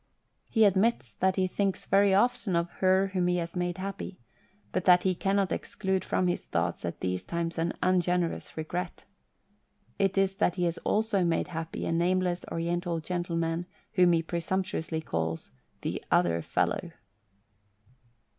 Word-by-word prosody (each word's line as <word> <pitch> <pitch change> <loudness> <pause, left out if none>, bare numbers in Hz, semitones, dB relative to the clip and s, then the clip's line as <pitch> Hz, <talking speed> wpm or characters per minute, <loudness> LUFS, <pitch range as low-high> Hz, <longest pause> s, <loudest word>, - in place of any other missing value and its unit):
He 225 -2 +5
admits 195 - +2
that 190 - +1
he 190 - +2
thinks 195 +1 -1
very 200 +1 +4
often 205 -1 +2
of 170 +1 0
"her 190 +1 +3
whom 180 -2 +1
he 180 - +2
has 170 0 -4
made 175 0 -1
happy," 195 0 -5 0.5
but 185 - -1
that 180 -1 +6
he 190 - +2
cannot 195 +1 +1
exclude 190 -2 -1
from 185 - 0
his 175 - 0
thoughts 85 +1 -1
at 85 - -5
these 90 0 -1
times 170 -1 -3
an 165 +1 0
ungenerous 180 -2 +1
regret. 175 +3 -4 1.0
It 195 0 +1
is 195 0 +2
that 180 - +2
he 180 - -1
has 170 -1 0
also 210 -3 +1
made 170 +1 0
happy 165 -1 -4
a - - -1
nameless 180 +1 +1
Oriental 170 0 -1
gentle 175 +1 -3
man 165 +1 -1 0.3
whom 180 -2 +5
he 165 -1 +2
presumptuously 170 -1 -2
calls 80 - -3
" - - -41
the - - -3
other 85 -1 +3
fellow." - - -1
180 Hz, 160 wpm, -29 LUFS, 165-190 Hz, 1.0 s, that